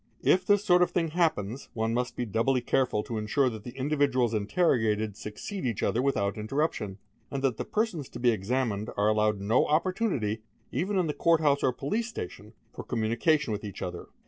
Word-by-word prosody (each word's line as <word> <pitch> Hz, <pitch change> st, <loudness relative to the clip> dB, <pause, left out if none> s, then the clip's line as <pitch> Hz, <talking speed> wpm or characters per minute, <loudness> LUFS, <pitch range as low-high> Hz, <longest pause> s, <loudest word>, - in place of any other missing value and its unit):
"it 180 Hz, 0 st, +3 dB
this 205 Hz, 0 st, +3 dB
sort 180 Hz, -2 st, +5 dB
of 180 Hz, -, +4 dB
thing 165 Hz, -2 st, 0 dB
happens, 140 Hz, -, -1 dB
one 110 Hz, 0 st, 0 dB
must 125 Hz, +1 st, -1 dB
be 120 Hz, -, -2 dB
doubly 115 Hz, +5 st, +1 dB
careful 120 Hz, -3 st, +1 dB
to 115 Hz, -2 st, -4 dB
ensure 125 Hz, +5 st, +1 dB
t 110 Hz, -, -6 dB
the 120 Hz, +4 st, -10 dB
individuals 135 Hz, -4 st, +1 dB
interrogated 110 Hz, -, +1 dB
succeed 110 Hz, -, -6 dB
each 115 Hz, -5 st, -1 dB
other 120 Hz, -, +1 dB
without 100 Hz, -7 st, 0 dB
interrup 140 Hz, +9 st, -1 dB
o, 95 Hz, -2 st, -5 dB, 0.3 s
and 140 Hz, -1 st, -4 dB
that 130 Hz, -5 st, +1 dB
the -, -, -2 dB
persons 210 Hz, -, -1 dB
to 120 Hz, -, -8 dB
be 120 Hz, 0 st, +4 dB
examined 110 Hz, 0 st, -1 dB
are 105 Hz, +1 st, +3 dB
allowed 105 Hz, -1 st, +2 dB
no 105 Hz, +5 st, +2 dB
opportunity, 155 Hz, -, 0 dB, 0.3 s
m 185 Hz, -, -1 dB
in 180 Hz, -, +2 dB
the 150 Hz, -, -1 dB
Court 165 Hz, +1 st, +3 dB
house 145 Hz, -2 st, +2 dB
or 130 Hz, -, +3 dB
police 210 Hz, -, -2 dB
station, 105 Hz, -, -7 dB, 0.2 s
for -, -, -7 dB
communication 120 Hz, +4 st, +1 dB
with 105 Hz, -, -4 dB
each 100 Hz, -3 st, -7 dB
he. 90 Hz, -, -3 dB
125 Hz, 200 wpm, -28 LUFS, 110-155 Hz, 0.3 s, sort